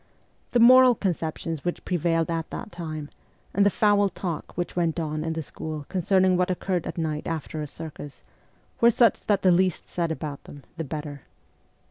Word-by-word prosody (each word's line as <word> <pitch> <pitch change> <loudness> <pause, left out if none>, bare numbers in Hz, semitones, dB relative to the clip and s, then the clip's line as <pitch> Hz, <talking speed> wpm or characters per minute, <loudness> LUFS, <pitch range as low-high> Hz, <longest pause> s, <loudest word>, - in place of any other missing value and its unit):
The 240 - +2
moral 255 +1 +8
conceptions 165 -5 -3
which 175 - -3
prevailed 170 -2 0
at 165 -1 -2
that - - -7
time, 155 -4 -6 0.4
and 200 - +3
the 200 - +5
foul 205 0 +3
talk 175 -4 -5
which 175 - -3
went 170 -1 0
on 155 -1 -2
in 160 0 -2
the 160 0 -3
school 155 +1 -6
con 185 - -1
cerning 185 0 +3
what 180 0 +1
occurred 180 -1 -1
at - - -6
night 155 -2 -2
after 160 -1 -4
a 150 - -4
circus, 145 -2 -9 0.6
were 235 - +6
such 235 -1 +3
that 205 -2 +2
the 185 - +6
least 185 0 +1
said 170 -2 -2
about 150 -3 -5
them 145 -1 -12
the 165 - -4
better. 150 -1 -6
170 Hz, 185 wpm, -25 LUFS, 155-190 Hz, 0.6 s, moral